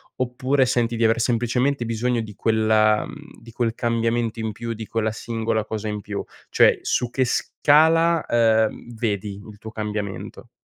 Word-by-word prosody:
oppure 130 Hz, +2 st, +1 dB
senti 120 Hz, -2 st, 0 dB
di 115 Hz, -, 0 dB
aver 115 Hz, +1 st, +3 dB
semplicemente 120 Hz, +3 st, 0 dB
bisogno 115 Hz, +1 st, 0 dB
di 110 Hz, -2 st, -8 dB
quella 110 Hz, -1 st, +2 dB
mhmm, -, -, -12 dB
di 115 Hz, 0 st, -13 dB
quel 115 Hz, 0 st, -1 dB
cambiamento 115 Hz, -1 st, -1 dB
in 110 Hz, -1 st, -3 dB
più, 115 Hz, +2 st, -5 dB
di 110 Hz, -1 st, -8 dB
quella 110 Hz, -1 st, -1 dB
singola 110 Hz, -1 st, -2 dB
cosa 110 Hz, 0 st, -4 dB
in 105 Hz, 0 st, -3 dB
più? 100 Hz, 0 st, -5 dB, 0.3 s
Cioè -, -, +4 dB
su 125 Hz, -, 0 dB
che 130 Hz, -, +1 dB
scala, 160 Hz, +6 st, +3 dB
ehm, 115 Hz, 0 st, +1 dB
vedi 105 Hz, -3 st, -2 dB
il 105 Hz, -1 st, -12 dB
tuo 110 Hz, -, -8 dB
cambiamento? 105 Hz, -2 st, -5 dB
115 Hz, 165 wpm, -23 LUFS, 110-120 Hz, 0.3 s, Cioè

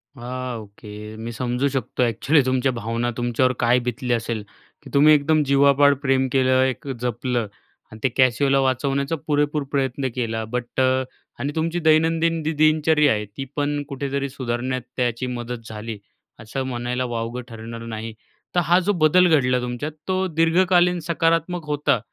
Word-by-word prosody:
हां 125 Hz, -1 st, -5 dB
ओके. 105 Hz, 0 st, -13 dB, 0.3 s
मी 115 Hz, +1 st, -6 dB
समजू 125 Hz, +3 st, -1 dB
शकतो 130 Hz, -2 st, -1 dB
ॲक्चुअली 140 Hz, +6 st, +3 dB
तुमच्या 130 Hz, +1 st, +1 dB
भावना. 115 Hz, +1 st, -2 dB
तुमच्यावर 120 Hz, +1 st, +1 dB
काय 120 Hz, +1 st, +3 dB
बितली 125 Hz, +1 st, -1 dB
असेल 115 Hz, -2 st, -2 dB, 0.4 s
की -, -, -11 dB
तुम्ही 150 Hz, +2 st, +6 dB
एकदम 150 Hz, +1 st, +3 dB
जीवापाड 140 Hz, +1 st, +4 dB
प्रेम 135 Hz, -1 st, +2 dB
केलं, 130 Hz, -1 st, +3 dB
एक 130 Hz, +2 st, -3 dB
जपलं 125 Hz, -1 st, -1 dB, 0.4 s
आणि 110 Hz, -, -11 dB
त्या 130 Hz, -, +2 dB
कॅसिओला 135 Hz, +2 st, +3 dB
वाचवण्याचा 135 Hz, +3 st, 0 dB
पुरेपूर 145 Hz, 0 st, +1 dB
प्रयत्न 135 Hz, -1 st, -1 dB
केला. 115 Hz, -3 st, -2 dB
बट 120 Hz, +2 st, -4 dB
अ, 130 Hz, 0 st, +2 dB, 0.4 s
आणि 140 Hz, -, -2 dB
तुमची 165 Hz, +2 st, -1 dB
दैनंदिन 165 Hz, +1 st, +2 dB
जी 155 Hz, -, 0 dB
दिनचर्या 155 Hz, -1 st, +3 dB
आहे, 105 Hz, 0 st, -2 dB
ती 105 Hz, +7 st, -7 dB
पण 145 Hz, 0 st, -1 dB
कुठेतरी 140 Hz, 0 st, -3 dB
सुधारण्यात 130 Hz, 0 st, -3 dB, 0.2 s
त्याची 125 Hz, 0 st, -1 dB
मदत 120 Hz, -1 st, -6 dB
झाली, 110 Hz, 0 st, -6 dB, 0.4 s
असं 115 Hz, +5 st, -4 dB
म्हणायला 125 Hz, 0 st, -2 dB
वावगं 120 Hz, 0 st, -4 dB
ठरणार 115 Hz, +1 st, -8 dB
नाही. 115 Hz, 0 st, -6 dB, 0.4 s
तर -, -, +5 dB
हा 175 Hz, +3 st, +5 dB
जो 195 Hz, +3 st, 0 dB
बदल 180 Hz, +4 st, +5 dB
घडला 125 Hz, -2 st, +2 dB
तुमच्यात, 125 Hz, +5 st, -4 dB, 0.2 s
तो 185 Hz, 0 st, 0 dB
दीर्घकालीन 175 Hz, +2 st, +3 dB
सकारात्मक 165 Hz, 0 st, 0 dB
होता 145 Hz, -4 st, +1 dB
130 Hz, 155 wpm, -22 LUFS, 120-150 Hz, 0.4 s, तुम्ही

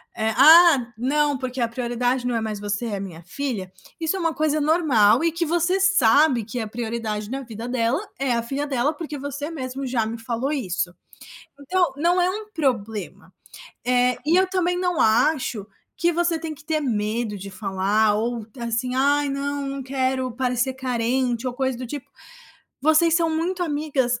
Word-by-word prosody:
eh: 220 Hz, -1 st, 0 dB
"Ah, 295 Hz, -2 st, +7 dB
não, 290 Hz, +4 st, +1 dB
porque 255 Hz, -1 st, -4 dB
a 235 Hz, -, +2 dB
prioridade 245 Hz, +1 st, -1 dB
não 245 Hz, -1 st, 0 dB
é 225 Hz, -, 0 dB
mais 215 Hz, -2 st, -4 dB
você, 205 Hz, +3 st, -2 dB
é 205 Hz, -3 st, -3 dB
minha 180 Hz, -4 st, -7 dB
filha", 210 Hz, -2 st, -4 dB, 0.3 s
isso 325 Hz, +2 st, 0 dB
é -, -, -3 dB
uma 330 Hz, -2 st, 0 dB
coisa 310 Hz, 0 st, 0 dB
normal 295 Hz, -8 st, +4 dB
e 335 Hz, -, +2 dB
que 335 Hz, +1 st, -1 dB
você 345 Hz, +3 st, +1 dB
sabe 290 Hz, -, +4 dB
que 230 Hz, +4 st, -5 dB
a 220 Hz, -, -3 dB
prioridade 220 Hz, -2 st, -4 dB
na 270 Hz, +2 st, -3 dB
vida 230 Hz, -2 st, -7 dB
dela 245 Hz, 0 st, +1 dB, 0.2 s
é 270 Hz, -1 st, -1 dB
a 235 Hz, -, +1 dB
filha 275 Hz, +5 st, -3 dB
dela, 280 Hz, +1 st, 0 dB
porque 305 Hz, -1 st, -6 dB
você 285 Hz, +2 st, -5 dB
mesmo 270 Hz, -3 st, -5 dB
já 245 Hz, -3 st, 0 dB
me 230 Hz, +1 st, -5 dB
falou 240 Hz, +3 st, -3 dB
isso. 185 Hz, -, -2 dB, 0.7 s
Então, 350 Hz, +2 st, +1 dB
não 345 Hz, +5 st, +2 dB
é 360 Hz, +1 st, +2 dB
um 425 Hz, +2 st, -6 dB
problema, 225 Hz, -, -3 dB, 0.5 s
eh, 250 Hz, 0 st, +2 dB
e 330 Hz, +3 st, +4 dB
eu 375 Hz, +1 st, +4 dB
também 360 Hz, -1 st, +1 dB
não 360 Hz, -2 st, 0 dB
acho 235 Hz, -2 st, +2 dB, 0.3 s
que 345 Hz, +2 st, +2 dB
você 340 Hz, 0 st, +1 dB
tem 320 Hz, -1 st, -5 dB
que 290 Hz, -, -17 dB
ter 310 Hz, 0 st, 0 dB
medo 220 Hz, -4 st, -2 dB
de 195 Hz, +1 st, -8 dB
falar 200 Hz, +2 st, +1 dB
ou, 230 Hz, +1 st, -2 dB
assim: 235 Hz, +2 st, -2 dB
"Ai, 285 Hz, +2 st, +2 dB
não, 280 Hz, 0 st, -3 dB
não 275 Hz, 0 st, -4 dB
quero 260 Hz, -1 st, -1 dB
parecer 250 Hz, +1 st, -1 dB
carente", 250 Hz, -1 st, -1 dB
ou 250 Hz, -, -2 dB
coisa 260 Hz, -1 st, -1 dB
do 255 Hz, -, -5 dB
tipo. 280 Hz, +2 st, -7 dB, 0.7 s
Vocês 315 Hz, +3 st, +4 dB
são 330 Hz, -1 st, +2 dB
muito 345 Hz, +3 st, -1 dB
amigas 290 Hz, -6 st, 0 dB
260 Hz, 185 wpm, -23 LUFS, 230-305 Hz, 0.7 s, Ah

